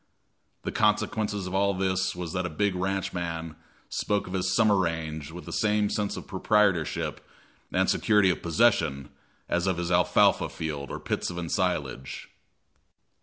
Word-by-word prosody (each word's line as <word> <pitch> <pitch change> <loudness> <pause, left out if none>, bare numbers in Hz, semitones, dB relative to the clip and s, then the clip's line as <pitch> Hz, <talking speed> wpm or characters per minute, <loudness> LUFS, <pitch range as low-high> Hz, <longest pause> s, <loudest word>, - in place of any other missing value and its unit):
The - - -2
consequence 105 0 +1
of 95 -2 -4
all 100 0 +2
this 95 -1 0
was 90 -2 -5
that 90 -1 -1
a - - -6
big 100 +5 0
ranchman 90 -4 -3 0.3
spoke 105 -1 -1
of 90 - -8
his 95 0 0
summer 110 -3 +5
range 80 -5 -2
with 90 +2 -9
the - - -7
same 105 -1 +1
sense 105 -1 -1
of - - -7
proprietorship 100 -7 +1 0.5
and - - +2
security 105 -4 +4
of - - -4
possession 85 - +2 0.4
as 90 +2 0
of 95 -2 +1
his 85 0 -2
alfalfa 85 - +4
field 75 -4 -5
or - - -5
pits - - -2
of 85 - -6
ensilage. 80 -6 -2
90 Hz, 155 wpm, -27 LUFS, 85-100 Hz, 0.5 s, summer